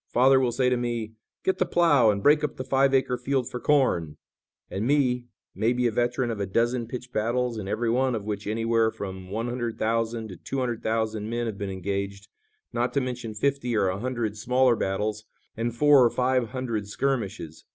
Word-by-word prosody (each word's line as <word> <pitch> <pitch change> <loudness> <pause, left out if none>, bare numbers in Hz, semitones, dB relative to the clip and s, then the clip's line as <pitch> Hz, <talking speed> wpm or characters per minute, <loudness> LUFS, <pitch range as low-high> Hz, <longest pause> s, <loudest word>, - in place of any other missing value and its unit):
Father 130 +2 +5
will 125 -2 +1
say 125 +2 +1
to 125 0 +2
me: 120 -2 -3 0.3
'Get 190 - 0
the 185 - +3
plough 145 -11 +4
and 100 -1 0
break 150 +1 +5
up 150 - -2
the 130 - -3
five 135 +1 +2
acre 130 -2 +1
field 130 -1 0
for 125 - -4
corn,' 90 - +1 0.5
and 100 +4 -3
me, 125 -4 +2 0.3
maybe 120 +3 +1
a 120 - +3
veteran 120 +1 0
of 110 - -4
a 100 - -1
dozen 115 +4 0
pitched 125 +1 -7
battles 120 +1 0
in 95 - -6
every 115 +3 0
one 130 +1 +1
of 105 -2 -5
which 105 -1 -4
anywhere 115 +1 +2
from 95 -3 -7
one 115 +4 -2
hundred 120 -2 -3
thousand 115 0 -1
to 90 - -9
two 135 - -5
hundred 120 -3 -1
thousand 110 -1 -1
men 120 +1 -1
have 110 -3 -5
been 100 -1 -3
engaged, 100 +1 -4 0.4
not 120 +1 0
to 140 - +2
mention 125 -4 -4
fifty 125 -1 0
or 95 -2 +2
a 95 +1 -3
hundred 120 -3 -2
smaller 125 +3 +3
battles 105 +2 -2 0.3
and 115 +1 -2
four 145 0 +6
or 120 - +5
five 125 -2 +1
hundred 115 -5 -3
skirmishes. 100 - -3
120 Hz, 205 wpm, -26 LUFS, 105-125 Hz, 0.5 s, four